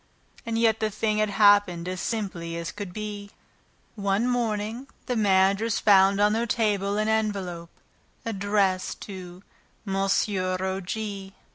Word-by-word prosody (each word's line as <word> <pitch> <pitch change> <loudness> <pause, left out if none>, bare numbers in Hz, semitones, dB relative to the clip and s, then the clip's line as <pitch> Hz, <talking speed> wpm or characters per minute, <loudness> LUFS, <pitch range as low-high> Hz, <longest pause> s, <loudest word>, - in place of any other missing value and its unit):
And 225 0 -1
yet 225 -1 +3
the 220 - 0
thing 215 0 -1
had 215 -1 +2
happened 205 -4 +4
as 185 -1 -4
simply 180 -7 -3
as 170 0 -4
could 205 -3 -7
be. 205 0 -6 0.7
One 200 +2 0
morning, 230 0 -2 0.2
the 250 - -2
managers 200 +1 +3
found 195 -1 +5
on 210 +1 +4
their 230 +2 0
table 205 -3 0
an 215 0 0
envelope 195 -6 -1 0.6
addressed 200 -3 0
to 185 -2 -9 0.4
"Monsieur 195 -1 0
O. 190 0 -2
G. 195 0 -5
205 Hz, 135 wpm, -26 LUFS, 190-215 Hz, 0.7 s, found